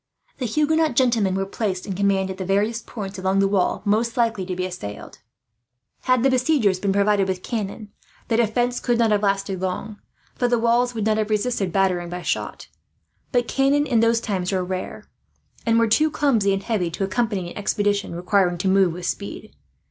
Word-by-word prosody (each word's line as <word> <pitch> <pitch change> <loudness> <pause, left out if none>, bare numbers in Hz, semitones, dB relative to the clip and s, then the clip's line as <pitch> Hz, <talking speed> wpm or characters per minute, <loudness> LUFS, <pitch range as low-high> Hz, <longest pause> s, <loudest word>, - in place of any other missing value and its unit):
The 250 - -1
Huguenot 305 +3 +1
gentlemen 230 -7 +2
were 195 0 -1
placed 195 -2 -3
in 195 - -4
command, 195 0 +1
at 190 - -8
the - - -2
various 205 +5 0
points 195 -4 -7
along 190 +1 0
the 195 0 +4
wall 195 -2 0
most 225 +3 +1
likely 225 -6 0
to 185 - -3
be 185 0 -2
assailed. 175 - -8 0.9
Had 255 -2 +3
the 270 - +4
besiegers 250 -7 +2
been 195 0 0
provided 200 0 +2
with 185 -1 -3
cannon, 210 -1 -4 0.4
the 225 - +1
defence 240 +2 +1
could 240 -2 0
not 230 -2 +3
have 205 -1 +2
lasted 195 -2 -1
long, 190 +3 -4 0.3
for 245 - 0
the 240 0 +2
walls 235 +1 +2
would 215 -2 -2
not 215 0 +2
have 215 0 -1
resisted 210 -3 0
battering 180 -2 +1
by 180 0 -6
shot; - - -3 0.6
but 245 -2 +1
cannon, 275 +2 +2
in 240 -5 +2
those 230 0 +3
times, 195 -5 -2
were 185 -2 0
rare, 185 0 -5 0.6
and 230 0 +4
were 230 - +4
too 305 +8 +3
clumsy 235 -10 +2
and 195 0 -1
heavy 205 -7 -1
to 175 +4 -4
accompany 195 -3 -1
an - - -11
expedition 205 -2 0
requiring 180 0 +1
to 180 - -2
move 190 -2 +3
with 175 +1 -7
speed. 200 +3 -5
205 Hz, 195 wpm, -22 LUFS, 190-235 Hz, 0.9 s, the